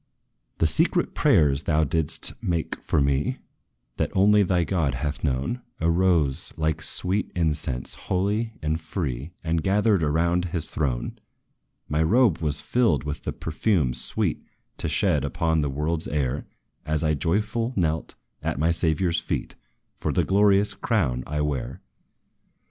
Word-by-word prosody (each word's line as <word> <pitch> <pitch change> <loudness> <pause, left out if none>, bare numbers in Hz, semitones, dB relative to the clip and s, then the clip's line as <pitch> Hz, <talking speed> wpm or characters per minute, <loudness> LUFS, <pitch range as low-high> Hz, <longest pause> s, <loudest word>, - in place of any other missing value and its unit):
"The - - +2
secret - - +2
prayers, 70 -3 +3
thou 80 -1 +1
didst 80 0 0
make 85 -3 -1
for - - 0
me, 70 0 +1 0.6
That - - 0
only 105 +2 +5
thy 90 -3 +2
God 80 -6 0
hath 75 +3 -4
known, 70 - -1 0.2
Arose, 85 -4 +1
like 80 0 0
sweet 95 +5 0
incense, 75 -7 -1
holy 105 +4 -1
and 80 +2 -1
free, 75 -5 -4
And 80 0 0
gathered 100 +1 +2
around 85 +4 +1
his 85 -2 -2
throne. 65 -6 -2 0.7
"My 75 +1 0
robe 105 +2 +3
was 75 -2 +1
filled 115 - +1
with 75 0 -5
the - - -1
perfume 80 - 0
sweet 60 - 0 0.3
To - - -1
shed 75 -3 +2
upon 80 +1 0
this 75 - 0
world's 75 +4 -1
air, 70 -2 -2 0.4
As 75 0 -1
I 80 0 +2
joyful 105 - 0
knelt, 80 -4 -1 0.3
at - - -2
my 80 +4 +2
Saviour's 85 +1 +1
feet, - - -4 0.5
For - - -1
the - - +1
glorious 100 +1 +3
crown 75 - 0
I 75 +1 -2
wear. 75 -4 -3
80 Hz, 145 wpm, -25 LUFS, 75-95 Hz, 0.7 s, only